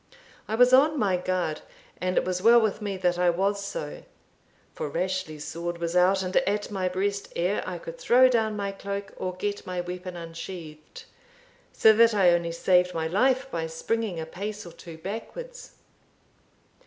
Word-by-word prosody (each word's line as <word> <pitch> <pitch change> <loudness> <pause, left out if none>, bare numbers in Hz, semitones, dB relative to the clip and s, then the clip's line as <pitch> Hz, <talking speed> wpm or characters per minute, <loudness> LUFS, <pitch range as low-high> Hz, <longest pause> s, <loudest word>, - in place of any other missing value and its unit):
I 220 - -1
was 250 +2 +5
on 295 +4 +5
my 200 -7 +2
guard, 180 -3 -2 0.4
and 185 0 -2
it - - +3
was 180 0 -2
well 235 +3 +7
with 215 -1 0
me 200 -2 -3
that 180 -1 0
I 180 0 +4
was 200 +3 0
so; 150 -6 -5 0.7
for 150 - -4
Rashleigh's 170 -3 -3
sword 170 +3 -4
was 170 0 -3
out 190 +2 +4
and 185 0 -4
at 210 -6 0
my 185 -2 -1
breast 200 +2 -2
ere 180 +4 0
I - - -4
could - - -9
throw 255 - +6
down 220 -4 +1
my 200 -1 -2
cloak, 200 0 -6
or 185 -1 -4
get 205 +2 -4
my 180 -1 -3
weapon 180 +1 -5
unsheathed, 165 -2 -9 0.7
so 220 - +6
that 230 0 +5
I 185 -3 +5
only 170 -1 +1
saved 180 +1 +2
my 160 -1 -1
life 260 +10 +1
by 165 -1 -2
springing 190 +3 -2
a 160 - -4
pace 205 +5 -6
or 170 - -9
two 165 -1 -11
backwards. 470 - -7
185 Hz, 180 wpm, -26 LUFS, 175-215 Hz, 0.7 s, well